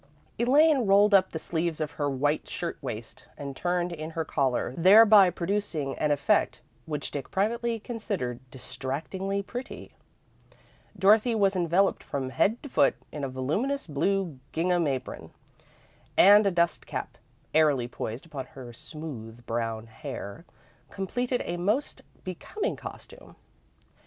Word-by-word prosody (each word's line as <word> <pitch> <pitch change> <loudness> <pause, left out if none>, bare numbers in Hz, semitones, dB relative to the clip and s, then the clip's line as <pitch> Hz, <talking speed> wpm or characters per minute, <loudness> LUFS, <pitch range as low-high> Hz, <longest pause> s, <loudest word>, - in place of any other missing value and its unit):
Elaine 275 0 +4
rolled 200 +1 +5
up 190 -1 +5
the - - -5
sleeves 165 0 -2
of 155 -1 -2
her 145 -2 -2
white 145 +3 -1
shirt - - -4
waist, - - -7
and 140 -1 -6
turned 175 +1 -1
in 155 -1 -5
her 165 0 -3
collar, 130 -4 0
thereby 205 +2 +7
producing 170 -7 -2
an 150 - +1
effect 145 -1 +2 0.3
which 150 -2 -4
Dick 145 - -5
privately 230 +4 0
considered 200 - -4
distractingly 145 +11 -4
pretty. 245 +6 -8 1.0
Dorothy 215 +4 +4
was 200 -2 +2
enveloped 180 +2 +2
from 130 -2 -4
head 220 - +1
to 285 - -7
foot - - +3 0.2
in 150 - -6
a 135 - -1
voluminous 175 - -1
blue 170 0 -1
gingham 175 0 +1
apron, 135 -2 -4 0.9
and 205 +1 +8
a - - +2
dust 170 -1 0
cap, - - -5 0.3
airily 145 -6 +3
poised 120 +1 -6
upon 140 -5 -7
her 125 -3 -11
smooth 120 -5 -9
brown 115 -1 -2
hair, 130 - -8 0.4
completed 245 +6 -2
a 175 - -3
most 210 +11 -1 0.2
becoming 405 - -4
costume. - - -11
170 Hz, 135 wpm, -27 LUFS, 140-200 Hz, 1.0 s, and